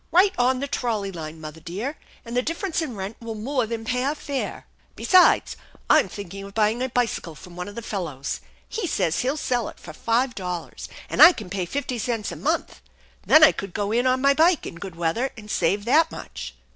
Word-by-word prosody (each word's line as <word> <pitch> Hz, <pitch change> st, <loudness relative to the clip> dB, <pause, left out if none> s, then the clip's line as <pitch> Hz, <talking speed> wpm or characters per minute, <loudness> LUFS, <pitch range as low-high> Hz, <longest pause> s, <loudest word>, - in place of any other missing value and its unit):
"Right 380 Hz, +3 st, +5 dB
on 255 Hz, +1 st, +2 dB
the 280 Hz, -, -2 dB
trolley 220 Hz, -7 st, -2 dB
line, 160 Hz, -2 st, -7 dB
mother 155 Hz, 0 st, -8 dB
dear; 205 Hz, -, -4 dB, 0.3 s
and 235 Hz, +1 st, -6 dB
the 250 Hz, -, +3 dB
differ 330 Hz, +8 st, -3 dB
ence 345 Hz, -3 st, -1 dB
in 260 Hz, -8 st, -4 dB
rent 195 Hz, +2 st, -5 dB
will 230 Hz, -1 st, -6 dB
more 250 Hz, +2 st, -1 dB
than 225 Hz, 0 st, -4 dB
pay 250 Hz, +1 st, 0 dB
our 285 Hz, +3 st, 0 dB
fare." 280 Hz, -3 st, -4 dB, 0.3 s
"Besides, 370 Hz, -1 st, +5 dB, 0.4 s
I'm -, -, +5 dB
thinking 195 Hz, -1 st, -7 dB
of 200 Hz, 0 st, -11 dB
buying 220 Hz, +2 st, +2 dB
a 260 Hz, -, -1 dB
bicycle 230 Hz, -9 st, -1 dB
from 175 Hz, +3 st, -13 dB
one 180 Hz, +1 st, -5 dB
of 205 Hz, -, -9 dB
the 235 Hz, -, -6 dB
fellows. 160 Hz, -11 st, -4 dB, 0.3 s
He 440 Hz, -5 st, -3 dB
says 180 Hz, -, 0 dB
he'll 265 Hz, +4 st, 0 dB
sell 245 Hz, -5 st, -1 dB
it -, -, -14 dB
for -, -, -10 dB
five 245 Hz, +3 st, +1 dB
dollars, 180 Hz, -4 st, -5 dB, 0.2 s
and -, -, 0 dB
I 340 Hz, +3 st, +11 dB
can 205 Hz, -, -9 dB
pay 185 Hz, -3 st, -2 dB
fifty 255 Hz, +1 st, -3 dB
cents 225 Hz, -2 st, -2 dB
a -, -, -6 dB
month. -, -, -2 dB, 0.5 s
Then 310 Hz, 0 st, +8 dB
I 310 Hz, -, +9 dB
could 195 Hz, -3 st, -7 dB
go 205 Hz, 0 st, -1 dB
in 240 Hz, +3 st, +2 dB
on 255 Hz, 0 st, +2 dB
my 280 Hz, +1 st, +5 dB
bike 325 Hz, +3 st, +3 dB
in -, -, -6 dB
good 185 Hz, -1 st, -8 dB
weather, 170 Hz, +11 st, 0 dB
and 210 Hz, -1 st, -9 dB
save 200 Hz, +4 st, +1 dB
that 315 Hz, +7 st, +4 dB
much." -, -, -8 dB
230 Hz, 220 wpm, -24 LUFS, 195-265 Hz, 0.5 s, I